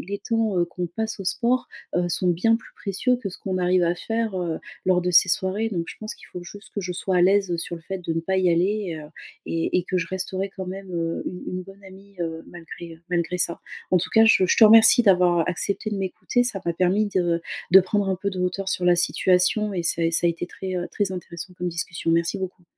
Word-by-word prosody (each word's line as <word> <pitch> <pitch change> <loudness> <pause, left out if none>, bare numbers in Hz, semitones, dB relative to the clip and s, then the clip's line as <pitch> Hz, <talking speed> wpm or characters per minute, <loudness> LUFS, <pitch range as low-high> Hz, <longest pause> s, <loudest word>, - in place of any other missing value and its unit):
les 200 +3 -5
temps, 225 -3 -1
heu, 175 - +3
qu'on 175 +1 -5
passe 220 +4 -4
au 195 - -6
sport, 245 +5 0 0.3
heu, 175 0 +1
sont 180 +1 0
bien 185 +7 +3
plus 225 - -15
précieux 210 +6 0
que 240 -5 -5
ce 185 - -9
qu'on 185 -1 -3
arrive 180 0 +2
à 170 0 +2
faire, 225 +2 -2
heu, 170 -2 -2 0.3
lors 180 -1 +3
de 180 - 0
ces 180 - +6
soirées. 190 +5 0
Donc 175 -6 -2
je - - -8
pense 215 0 -6
qu'il - - -16
faut 180 - -8
juste 205 +4 -12
que 205 - -2
je 180 -1 -4
sois 185 +1 -1
à 175 - +4
l'aise, 195 0 +3
heu, 170 - -1
sur 170 +1 -4
le 165 - -13
fait 190 +3 -5
de 170 -2 -4
ne 165 - 0
pas 190 +3 -1
y 185 -1 +3
aller, 180 +1 0
heu, - - -12 0.4
et 165 +1 -1
et - - 0
que 180 +1 -1
je 165 - -2
resterai 190 +1 -3
quand 190 -1 -5
même, 190 +1 -7
heu, 165 -1 -2
une 180 - -5
une 185 - -4
bonne 195 +2 -15
amie, 195 +1 -15
heu, 165 -1 -4
malgré, 170 0 -10
heu, 160 - -20
malgré 175 0 0
ça. 170 - -1 0.3
En 180 - +5
tout 175 - -3
cas, 225 0 +6
je 205 -4 +5
je - - +2
te 225 - +8
remercie 225 +2 +8
d'avoir 180 -5 +4
accepté 200 +2 0 0.2
de 210 - -2
m'écouter 195 +5 -1
ça 210 -6 -3
m'a 170 - 0
permis 185 +5 +2
de 175 -4 0 0.3
de 190 - +10
prendre 195 +2 -1
un 190 - +1
peu 200 +2 -3
de 185 - -6
hauteur 180 +2 -1
sur 180 - +2
la 175 0 +5
situation 185 +4 +2
et 175 - -1
ça 170 0 +1
a 165 - +2
ça 170 +1 +3
a - - +4
été 170 +1 -5
très, 185 +1 -5
heu, 175 0 -2
très 205 -2 -1
intéressant 180 0 -7
comme 180 - -2
discussion. 165 0 -2
Merci 170 +4 +1
beaucoup. 185 -1 -6
185 Hz, 260 wpm, -24 LUFS, 175-200 Hz, 0.4 s, de